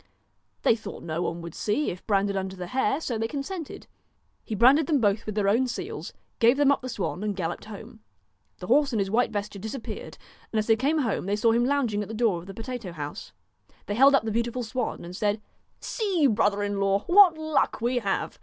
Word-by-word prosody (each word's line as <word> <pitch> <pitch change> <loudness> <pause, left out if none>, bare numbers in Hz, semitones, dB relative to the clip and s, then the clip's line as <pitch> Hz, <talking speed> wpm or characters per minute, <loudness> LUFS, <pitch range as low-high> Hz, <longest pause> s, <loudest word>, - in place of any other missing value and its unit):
They - - +5
thought 220 - -9
no 165 +1 -3
one 170 -1 -3
would 170 -1 -7
see 220 +8 -1
if 180 - -10
branded 200 -1 +1
under 190 0 -3
the 180 -1 -6
hair, 265 - 0
so 240 -8 -3
they 225 - 0
consented. 295 +5 -6 0.6
He 220 - -4
branded 265 +8 +5
them 300 -4 +2
both 210 -1 +1
with 215 - -4
their 205 -2 +1
own 235 +6 +3
seals, - - -5 0.3
gave 235 +3 +5
them 285 -1 +4
up 280 - +1
the 255 - -6
swan 200 -5 -3
and 210 -1 -1
galloped 175 -2 -4
home. 210 - -10 0.6
The 180 - -8
horse 275 +7 +3
and 220 - +1
his 195 -1 -1
white 245 +3 +2
vesture 205 -1 -4
disappeared, 220 +4 -7 0.3
and 225 - -2
as 215 - +1
they 225 - +4
came 280 +8 +1
home 230 -9 -1
they 200 - +1
saw 225 +2 +3
him 235 +1 +2
lounging 250 -7 +1
at 205 - -5
the 220 - -6
door 215 -6 +1
of 170 - -12
the 195 - -7
potato 230 -4 -6
house. 150 -2 -7 0.5
They 205 - -3
held 270 +5 +6
up 275 - +2
the 220 - -2
beautiful 235 +2 -1
swan, 235 -4 -3
and 175 +1 -8
said: 205 +2 0 0.2
' - - -43
See, 390 -9 0
brother 205 -4 +2
in 205 -1 -2
law, 195 0 +2
what 360 -3 +7
luck 315 -6 0
we 245 +2 +1
have. 200 -4 -2
225 Hz, 230 wpm, -26 LUFS, 200-260 Hz, 0.6 s, what